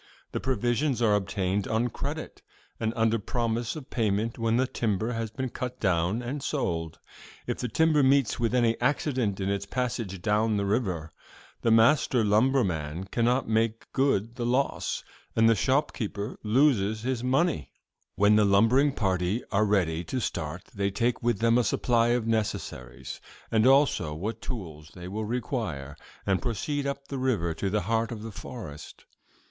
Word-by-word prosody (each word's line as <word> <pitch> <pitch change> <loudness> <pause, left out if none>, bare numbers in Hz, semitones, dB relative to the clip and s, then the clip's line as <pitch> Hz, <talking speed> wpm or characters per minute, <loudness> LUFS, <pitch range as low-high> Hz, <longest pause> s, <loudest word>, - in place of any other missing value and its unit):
The - - -2
provisions 125 +2 0
are 105 -2 +4
obtained 100 -1 0
on 115 +2 +1
credit - - -5 0.4
and 110 0 0
under 115 0 +2
promise 115 +3 -2
of 145 -3 -9
payment 110 0 0
when 115 0 +2
the 130 - +3
timber 110 -2 -1
has 115 -1 -3
been 130 +3 -4
cut 125 +1 -5
down 95 +4 +1
and 135 +4 -4
sold. 85 - -2 0.5
If - - -3
the 125 - -1
timber 155 +5 +3
meets 135 -3 +3
with 120 +1 +1
any 115 -2 +2
accident 125 -6 0
in 95 - -1
its 100 0 -2
passage 115 -5 -2
down 105 +3 +1
the 100 - 0
river, 95 -7 -1 0.5
the 115 - +2
master 115 +2 +4
lumberman 100 - +1
cannot 120 +2 +1
make 110 0 0
good 120 -4 +1
the 120 - -2
loss, 125 +3 0 0.3
and 115 0 +5
the 115 - +6
shopkeeper 115 -3 -1
loses 110 -3 +2
his 125 -1 -1
money. 135 - +1 0.4
"'When 105 +2 +5
the 105 - +5
lumbering 115 +8 +4
party 95 0 0
are 105 +1 +3
ready 90 -5 +1
to 130 - -2
start, - - -3
they 100 0 0
take 115 +5 0
with 120 -2 +1
them 115 +3 +3
a - - +3
supply 115 +1 +2
of 120 -1 +1
necessaries, 105 - -3 0.3
and 110 +2 +4
also 135 - +3
what 105 +8 -4
tools 80 - -7
they 90 -1 -8
will 105 +3 -3
require, 110 - -3 0.3
and 95 -1 +1
proceed 140 +4 -2
up 140 0 -4
the 135 - -4
river 105 -11 0
to 95 +5 -2
the 105 +2 0
heart 115 +4 0
of 110 -2 -6
the 115 - -6
forest. 95 - -9
115 Hz, 165 wpm, -27 LUFS, 100-125 Hz, 0.5 s, the